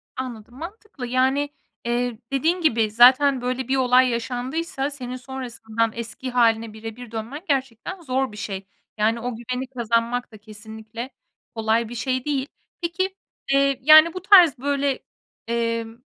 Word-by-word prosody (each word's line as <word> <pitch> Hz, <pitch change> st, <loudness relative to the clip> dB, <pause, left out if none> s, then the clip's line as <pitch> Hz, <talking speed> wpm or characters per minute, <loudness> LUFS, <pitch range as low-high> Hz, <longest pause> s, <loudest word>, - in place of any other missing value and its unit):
Anladım, 240 Hz, -3 st, -7 dB
mantıklı. 340 Hz, -, -8 dB
Yani, 265 Hz, +3 st, +1 dB, 0.4 s
eee, 240 Hz, 0 st, -1 dB
dediğin 320 Hz, +7 st, +1 dB
gibi 225 Hz, -9 st, +2 dB
zaten 255 Hz, +4 st, +6 dB
böyle 250 Hz, 0 st, -2 dB
bir 265 Hz, -, +1 dB
olay 255 Hz, 0 st, +4 dB
yaşandıysa 260 Hz, +5 st, -2 dB
senin 255 Hz, -3 st, -6 dB
sonrasından 240 Hz, -4 st, -3 dB
eski 235 Hz, +2 st, -6 dB
hâline 230 Hz, -2 st, +2 dB
birebir 225 Hz, +2 st, -9 dB
dönmen 230 Hz, +7 st, -5 dB
gerçekten 270 Hz, -, -2 dB
zor 265 Hz, -4 st, -1 dB
bir 210 Hz, -, -11 dB
şey. 195 Hz, -2 st, -5 dB, 0.3 s
Yani, 220 Hz, +2 st, +1 dB
o 245 Hz, 0 st, -4 dB
güveni 250 Hz, +3 st, -4 dB
kazanmak 240 Hz, -1 st, -1 dB
da 215 Hz, -, -12 dB
kesinlikle 220 Hz, +3 st, -9 dB, 0.5 s
kolay 225 Hz, 0 st, +1 dB
bir 240 Hz, -, -7 dB
şey 255 Hz, +1 st, -2 dB
değil. 280 Hz, -2 st, -1 dB, 0.3 s
Peki, 370 Hz, +3 st, -2 dB, 0.4 s
eee, 275 Hz, -1 st, +3 dB
yani, 310 Hz, +4 st, +8 dB
bu 370 Hz, -, -6 dB
tarz, 360 Hz, -7 st, +7 dB
böyle, 280 Hz, +1 st, 0 dB, 0.5 s
emm, 230 Hz, -1 st, -2 dB
250 Hz, 140 wpm, -23 LUFS, 230-275 Hz, 0.5 s, yani